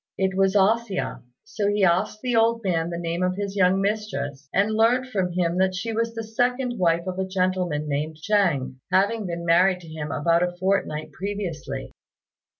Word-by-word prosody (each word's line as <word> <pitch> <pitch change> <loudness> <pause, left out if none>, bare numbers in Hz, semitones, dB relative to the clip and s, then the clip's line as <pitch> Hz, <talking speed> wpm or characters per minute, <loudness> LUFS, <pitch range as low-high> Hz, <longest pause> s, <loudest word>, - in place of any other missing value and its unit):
It 190 -1 0
was 195 +1 +2
A 205 +3 +5
hsia. 220 -5 -4 0.2
So 215 -1 -2
he 205 0 +1
asked 190 +4 +2
the 250 -2 0
old 230 0 +3
man 170 -3 0
the 170 - -4
name 170 +1 -3
of 180 0 +1
his 200 0 -4
young 190 -1 +3
mistress, 195 -10 -3
and 205 +3 +2
learnt 235 +4 +3
from 190 -8 -1
him 175 0 0
that 190 0 +2
she 225 +5 -3
was 230 +1 -1
the 225 - -3
second 245 +2 -1
wife 170 -1 +2
of 185 0 -4
a 190 - -1
gentleman 185 -5 -1
named 150 +2 -2
Chêng, 155 -9 +1
having 205 +2 +2
been 170 0 -4
married 180 +2 +4
to 165 - -13
him 155 -2 -6
about 170 +3 +2
a 175 0 -1
fortnight 185 -5 -1
previously. 195 -5 -5
190 Hz, 190 wpm, -24 LUFS, 170-210 Hz, 0.2 s, A